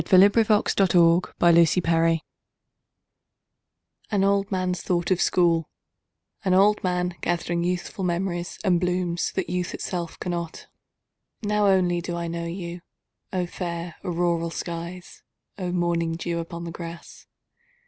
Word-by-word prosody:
263. 205 Hz, +2 st, +4 dB
An 190 Hz, -, +3 dB
Old 170 Hz, 0 st, +4 dB
Man's 170 Hz, -2 st, +4 dB
Thought 180 Hz, -, +1 dB
of 165 Hz, 0 st, +3 dB
School 165 Hz, -, +4 dB, 2.0 s
AN 200 Hz, -3 st, +1 dB
old 200 Hz, 0 st, +2 dB
man's 185 Hz, -2 st, -1 dB
thought 175 Hz, 0 st, -1 dB
of 185 Hz, -, +2 dB
School; 170 Hz, -2 st, +2 dB, 0.7 s
An 190 Hz, -2 st, +2 dB
old 205 Hz, +2 st, +4 dB
man, 180 Hz, -1 st, 0 dB
gathering 175 Hz, 0 st, -1 dB
youthful 180 Hz, +2 st, -3 dB
memories 175 Hz, 0 st, -2 dB
and 180 Hz, -4 st, +3 dB
blooms, 180 Hz, -1 st, -1 dB
that 190 Hz, -, -2 dB
youth 180 Hz, +1 st, -2 dB
itself 175 Hz, -3 st, -4 dB
cannot. 170 Hz, -2 st, -4 dB, 0.8 s
Now 210 Hz, 0 st, +2 dB
only 180 Hz, -3 st, +3 dB
do 175 Hz, 0 st, -4 dB
I 170 Hz, 0 st, -3 dB
know 170 Hz, 0 st, -4 dB
you!O 175 Hz, +1 st, -6 dB
fair 170 Hz, -1 st, -5 dB
auroral 170 Hz, -1 st, 0 dB
skies! 170 Hz, +2 st, -6 dB, 0.4 s
O 180 Hz, -1 st, -2 dB
morning 170 Hz, -2 st, 0 dB
dew 170 Hz, 0 st, -3 dB
upon 170 Hz, 0 st, -6 dB
the 170 Hz, -, -5 dB
grass! 170 Hz, 0 st, -9 dB
175 Hz, 135 wpm, -25 LUFS, 170-185 Hz, 2.0 s, 263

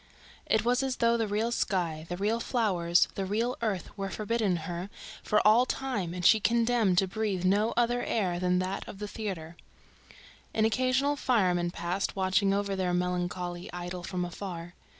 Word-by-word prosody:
It 220 Hz, -, +2 dB
was 245 Hz, +2 st, +3 dB
as 265 Hz, -1 st, -1 dB
though 235 Hz, -2 st, +3 dB
the 225 Hz, -2 st, 0 dB
real 215 Hz, +3 st, 0 dB
sky, 170 Hz, -8 st, -1 dB
the 175 Hz, -, -3 dB
real 215 Hz, +4 st, 0 dB
flowers, 185 Hz, -9 st, +2 dB
the 195 Hz, -, -3 dB
real 225 Hz, +6 st, -1 dB
earth 210 Hz, -6 st, -2 dB
were 195 Hz, -1 st, -3 dB
forbidden 215 Hz, -2 st, 0 dB
her 175 Hz, +3 st, -5 dB, 0.3 s
for 210 Hz, -, +1 dB
all 235 Hz, +4 st, +5 dB
time 210 Hz, -12 st, -2 dB
and 180 Hz, -1 st, -4 dB
she 220 Hz, -, +7 dB
condemned 230 Hz, -4 st, +2 dB
to 195 Hz, -, +4 dB
breathe 195 Hz, -2 st, -2 dB
no 205 Hz, +4 st, +3 dB
other 240 Hz, 0 st, +2 dB
air 180 Hz, -6 st, 0 dB
than 180 Hz, 0 st, +2 dB
that 185 Hz, +2 st, -2 dB
of -, -, -8 dB
the 210 Hz, +1 st, -5 dB
theater. 185 Hz, -7 st, -5 dB, 1.0 s
An 220 Hz, -, +3 dB
occasional 255 Hz, +5 st, +2 dB
fireman 180 Hz, -10 st, +2 dB
passed, 175 Hz, +2 st, -2 dB
watching 190 Hz, +1 st, +2 dB
over 200 Hz, 0 st, 0 dB
their 180 Hz, -2 st, 0 dB
melancholy 180 Hz, 0 st, -2 dB
idyll 180 Hz, 0 st, -5 dB
from 180 Hz, 0 st, -3 dB
afar. 175 Hz, -1 st, -7 dB
195 Hz, 170 wpm, -29 LUFS, 180-225 Hz, 1.0 s, she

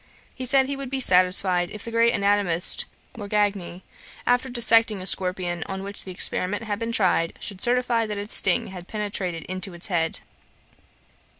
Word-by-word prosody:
He 255 Hz, -1 st, -6 dB
said 270 Hz, +1 st, +3 dB
he 280 Hz, +1 st, -4 dB
would 275 Hz, -2 st, -7 dB
be 270 Hz, 0 st, -3 dB
satisfied 180 Hz, -4 st, +5 dB
if 210 Hz, -, -8 dB
the 230 Hz, -, -6 dB
great 230 Hz, 0 st, +2 dB
anatomist 200 Hz, -4 st, +1 dB, 0.3 s
Morgagni, 205 Hz, -4 st, -3 dB, 0.4 s
after 245 Hz, +2 st, +1 dB
dissecting 230 Hz, -3 st, +3 dB
a 185 Hz, -, -8 dB
scorpion 180 Hz, -2 st, 0 dB
on 190 Hz, 0 st, -6 dB
which 200 Hz, +1 st, -5 dB
the 190 Hz, -, -7 dB
experiment 185 Hz, +3 st, +1 dB
had 210 Hz, -2 st, -4 dB
been 230 Hz, 0 st, -4 dB
tried, 180 Hz, -6 st, +1 dB
should 195 Hz, -2 st, -7 dB
certify 240 Hz, -2 st, +1 dB
that 210 Hz, -1 st, -5 dB
its 205 Hz, +2 st, -5 dB
sting 185 Hz, -, +3 dB
had 180 Hz, -2 st, -10 dB
penetrated 195 Hz, -5 st, -4 dB
into 185 Hz, 0 st, -5 dB
its 170 Hz, -, +1 dB
head. 165 Hz, -3 st, -1 dB
200 Hz, 170 wpm, -23 LUFS, 180-230 Hz, 0.4 s, satisfied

